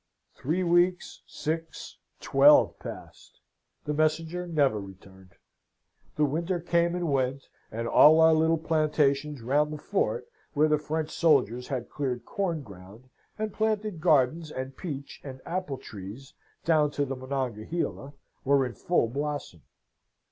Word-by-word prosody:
"Three 165 Hz, +7 st, -2 dB
weeks, 175 Hz, +1 st, +1 dB
six, 160 Hz, +1 st, -5 dB, 0.2 s
twelve, -, -, +5 dB
passed. -, -, -11 dB, 0.5 s
The 150 Hz, -, -1 dB
messenger 160 Hz, +3 st, 0 dB
never 140 Hz, -10 st, +2 dB
returned. 95 Hz, -1 st, -13 dB, 0.8 s
The 150 Hz, -, +3 dB
winter 170 Hz, +5 st, -1 dB
came 170 Hz, 0 st, +1 dB
and 175 Hz, -4 st, -1 dB
went, 135 Hz, 0 st, 0 dB, 0.3 s
and 115 Hz, +2 st, -3 dB
all 155 Hz, +6 st, +7 dB
our 160 Hz, 0 st, +6 dB
little 160 Hz, +1 st, +3 dB
plantations 150 Hz, -3 st, 0 dB
round 145 Hz, +5 st, +1 dB
the 150 Hz, -, -5 dB
fort, 205 Hz, -, -1 dB, 0.3 s
where 150 Hz, +2 st, +4 dB
the 150 Hz, -1 st, +2 dB
French 155 Hz, +1 st, -3 dB
soldiers 125 Hz, -, +2 dB
had 130 Hz, -4 st, -4 dB
cleared 125 Hz, -5 st, -3 dB
corn 170 Hz, -7 st, -2 dB
ground 100 Hz, +4 st, -14 dB, 0.3 s
and 215 Hz, -1 st, -3 dB
planted 215 Hz, -5 st, -1 dB
gardens 155 Hz, -1 st, +2 dB
and 130 Hz, -2 st, -6 dB
peach 140 Hz, -5 st, -7 dB
and 130 Hz, -2 st, -8 dB
apple 175 Hz, -6 st, -3 dB
trees 110 Hz, +4 st, -10 dB, 0.3 s
down 155 Hz, -3 st, +3 dB
to 145 Hz, -, 0 dB
the 135 Hz, 0 st, -4 dB
Monongahela, 130 Hz, +2 st, -4 dB, 0.3 s
were 140 Hz, -1 st, +3 dB
in 125 Hz, -, -5 dB
full 175 Hz, -5 st, +1 dB
blossom. 140 Hz, -, -4 dB
150 Hz, 135 wpm, -27 LUFS, 130-165 Hz, 0.8 s, all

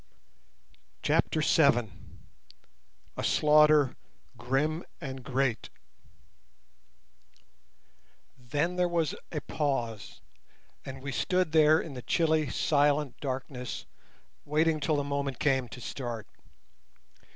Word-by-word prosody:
CHAPTER 155 Hz, -, +1 dB
VII. 135 Hz, -8 st, +3 dB, 1.3 s
A -, -, -3 dB
SLAUGHTER 150 Hz, -2 st, +4 dB, 0.4 s
GRIM 135 Hz, +8 st, -1 dB, 0.2 s
AND 135 Hz, -4 st, -7 dB
GREAT 130 Hz, -2 st, -1 dB, 2.7 s
Then 145 Hz, +8 st, -2 dB
there 180 Hz, 0 st, +3 dB
was 170 Hz, -3 st, 0 dB, 0.2 s
a 150 Hz, -, -3 dB
pause, 120 Hz, -8 st, -3 dB, 0.6 s
and 135 Hz, 0 st, -8 dB
we 140 Hz, -, -4 dB
stood 180 Hz, +4 st, 0 dB
there 155 Hz, 0 st, +5 dB
in 160 Hz, -, -6 dB
the 125 Hz, -, -7 dB
chilly 155 Hz, 0 st, +1 dB
silent 145 Hz, -2 st, +1 dB
darkness 130 Hz, -2 st, -5 dB, 0.6 s
waiting 155 Hz, +1 st, +1 dB
till 150 Hz, +2 st, 0 dB
the 145 Hz, -, 0 dB
moment 140 Hz, -1 st, -2 dB
came 130 Hz, -3 st, +1 dB
to -, -, -9 dB
start. 120 Hz, -2 st, -5 dB
145 Hz, 95 wpm, -29 LUFS, 130-155 Hz, 2.7 s, there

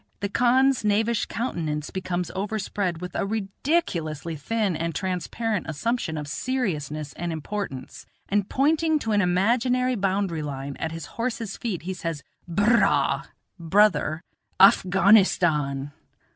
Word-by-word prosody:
the 200 Hz, -, -2 dB
khan's 250 Hz, +3 st, +3 dB
knavish 215 Hz, +2 st, +1 dB
countenance 155 Hz, -, -3 dB
becomes 180 Hz, -2 st, -3 dB
overspread 195 Hz, -3 st, -2 dB
with 180 Hz, -1 st, -6 dB
a -, -, -1 dB
ridiculously 195 Hz, -, -2 dB
thin 200 Hz, +5 st, -1 dB
and 165 Hz, 0 st, -3 dB
transparent 190 Hz, +4 st, -2 dB
assumption 160 Hz, +1 st, -2 dB
of 150 Hz, -1 st, -5 dB
seriousness 155 Hz, -, -2 dB
and 175 Hz, 0 st, -4 dB
importance, 160 Hz, -3 st, -5 dB, 0.2 s
and 205 Hz, 0 st, 0 dB
pointing 315 Hz, +3 st, +2 dB
to 225 Hz, -7 st, -3 dB
an 205 Hz, -1 st, +3 dB
imaginary 240 Hz, +8 st, +2 dB
boundary 195 Hz, -5 st, 0 dB
line 140 Hz, -1 st, -5 dB
at 160 Hz, -, -3 dB
his 165 Hz, -2 st, -6 dB, 0.2 s
horse's 230 Hz, -4 st, -2 dB
feet 200 Hz, -10 st, -4 dB
he 190 Hz, +2 st, -3 dB
says: 165 Hz, -5 st, -4 dB, 0.2 s
"Bur 205 Hz, +7 st, +3 dB
raa 140 Hz, -7 st, +2 dB, 0.3 s
(brother), 170 Hz, -2 st, +2 dB, 0.4 s
Afghanistan." 180 Hz, -8 st, +4 dB
190 Hz, 125 wpm, -25 LUFS, 160-225 Hz, 0.4 s, Afghanistan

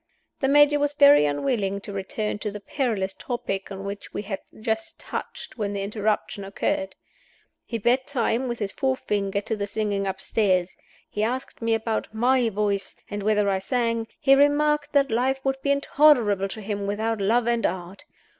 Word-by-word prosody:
The 270 Hz, -, +1 dB
Major 290 Hz, +1 st, +5 dB
was 290 Hz, 0 st, 0 dB
very 285 Hz, -, +7 dB
unwilling 200 Hz, -, -1 dB
to 205 Hz, -, -7 dB
return 205 Hz, +2 st, -3 dB
to 210 Hz, -, -3 dB
the 210 Hz, 0 st, -7 dB
perilous 205 Hz, -3 st, -2 dB
topic 195 Hz, -6 st, -4 dB
on 195 Hz, 0 st, -6 dB
which 200 Hz, +1 st, -6 dB
we -, -, -2 dB
had 195 Hz, -1 st, -4 dB, 0.2 s
just 220 Hz, 0 st, -2 dB
touched -, -, -7 dB
when 205 Hz, -1 st, -1 dB
the 200 Hz, -1 st, -2 dB
interruption 210 Hz, 0 st, -1 dB
occurred. 195 Hz, -1 st, -2 dB, 0.7 s
He 230 Hz, -, -3 dB
beat 245 Hz, +4 st, +1 dB
time 250 Hz, -1 st, 0 dB
with 240 Hz, -1 st, -3 dB
his 205 Hz, -3 st, -3 dB
forefinger 205 Hz, -7 st, -1 dB
to 220 Hz, +2 st, -2 dB
the 200 Hz, -1 st, -3 dB
singing 205 Hz, -1 st, -1 dB
upstairs; 190 Hz, -1 st, 0 dB, 0.3 s
he 210 Hz, -, -4 dB
asked 250 Hz, +4 st, -3 dB
me 230 Hz, 0 st, +2 dB
about 225 Hz, 0 st, -2 dB
my 245 Hz, +1 st, +3 dB
voice, 200 Hz, -2 st, -1 dB, 0.2 s
and 205 Hz, 0 st, -3 dB
whether 210 Hz, 0 st, +2 dB
I 195 Hz, -1 st, +1 dB
sang; 230 Hz, +1 st, -1 dB
he 270 Hz, -, +5 dB
remarked 290 Hz, +1 st, +3 dB
that 280 Hz, -3 st, +3 dB
life 260 Hz, +4 st, +1 dB
would 270 Hz, 0 st, 0 dB
be 280 Hz, -, -1 dB
intolerable 280 Hz, -8 st, +4 dB
to 215 Hz, +2 st, -7 dB
him 200 Hz, -1 st, -3 dB
without 220 Hz, +1 st, -1 dB
Love 225 Hz, +4 st, +2 dB
and 235 Hz, -1 st, +1 dB
Art. 185 Hz, +8 st, -3 dB
220 Hz, 175 wpm, -25 LUFS, 200-255 Hz, 0.7 s, very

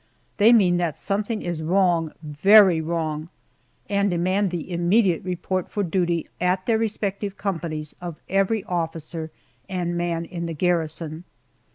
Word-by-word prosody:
They 220 Hz, +2 st, +6 dB
mean 190 Hz, -7 st, +5 dB
that 170 Hz, -4 st, -1 dB
something 210 Hz, +2 st, -2 dB
is 175 Hz, -2 st, -3 dB
wrong 170 Hz, -1 st, +2 dB
very 180 Hz, +4 st, +6 dB
wrong 160 Hz, -1 st, -3 dB, 0.6 s
and 200 Hz, 0 st, +1 dB
demand 185 Hz, +3 st, +1 dB
the 175 Hz, 0 st, -5 dB
immediate 175 Hz, +1 st, +2 dB
report 185 Hz, 0 st, -2 dB
for 205 Hz, -, -1 dB
duty 175 Hz, -2 st, 0 dB
at 180 Hz, +1 st, +1 dB
their 220 Hz, +1 st, +2 dB
respective 205 Hz, -2 st, -2 dB
companies 165 Hz, -6 st, -4 dB
of 170 Hz, -3 st, -6 dB
every 195 Hz, +2 st, +1 dB
officer 165 Hz, -2 st, -3 dB, 0.4 s
and 175 Hz, -2 st, -2 dB
man 170 Hz, -1 st, -1 dB
in 170 Hz, 0 st, -5 dB
the 165 Hz, -, -4 dB
garrison. 165 Hz, -1 st, -1 dB
175 Hz, 140 wpm, -24 LUFS, 165-195 Hz, 0.6 s, They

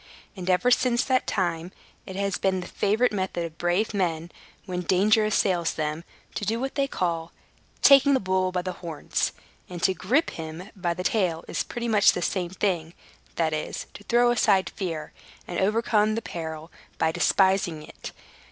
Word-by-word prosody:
And, 185 Hz, -1 st, -5 dB
ever 185 Hz, +7 st, +3 dB
since 245 Hz, -1 st, +3 dB
that 260 Hz, -1 st, +1 dB
time, 175 Hz, -3 st, -1 dB, 0.4 s
it 190 Hz, -, -7 dB
has 200 Hz, -1 st, -1 dB
been 190 Hz, -1 st, +1 dB
the -, -, -7 dB
favorite 220 Hz, +5 st, +1 dB
method 185 Hz, -4 st, -2 dB
of 165 Hz, -1 st, -9 dB
brave 175 Hz, +6 st, +1 dB
men, 170 Hz, -4 st, -1 dB, 0.3 s
when 180 Hz, -2 st, -3 dB
danger 205 Hz, +5 st, +3 dB
assails 185 Hz, -5 st, +1 dB
them, 155 Hz, +1 st, -3 dB, 0.3 s
to -, -, -4 dB
do 225 Hz, +3 st, -1 dB
what 270 Hz, +2 st, -3 dB
they 275 Hz, -1 st, 0 dB
call 170 Hz, -7 st, -2 dB, 0.5 s
"taking 275 Hz, 0 st, +7 dB
the -, -, +2 dB
bull 185 Hz, -2 st, 0 dB
by 180 Hz, -1 st, -2 dB
the 185 Hz, -, -3 dB
horns"; 170 Hz, -3 st, -3 dB, 0.4 s
and 175 Hz, -2 st, -7 dB
to 190 Hz, -, +4 dB
gripe 270 Hz, -, +1 dB
him 160 Hz, +4 st, -8 dB
by 175 Hz, -3 st, -2 dB
the 180 Hz, -, -4 dB
tail 180 Hz, -6 st, 0 dB
is -, -, -2 dB
pretty 240 Hz, 0 st, -4 dB
much 210 Hz, -3 st, +5 dB
the 180 Hz, -, -3 dB
same 180 Hz, -1 st, -1 dB
thing 175 Hz, -3 st, -2 dB, 0.4 s
that 160 Hz, -2 st, 0 dB
is, 155 Hz, 0 st, -4 dB
to -, -, -11 dB
throw 240 Hz, 0 st, +4 dB
aside 205 Hz, -5 st, +2 dB
fear, 165 Hz, -6 st, -5 dB, 0.3 s
and 175 Hz, -, -3 dB
overcome 215 Hz, +1 st, +2 dB
the 230 Hz, -, -2 dB
peril 160 Hz, -1 st, -6 dB, 0.3 s
by 160 Hz, -, +2 dB
despising 180 Hz, -2 st, +2 dB
it. -, -, -10 dB
185 Hz, 180 wpm, -26 LUFS, 170-215 Hz, 0.5 s, taking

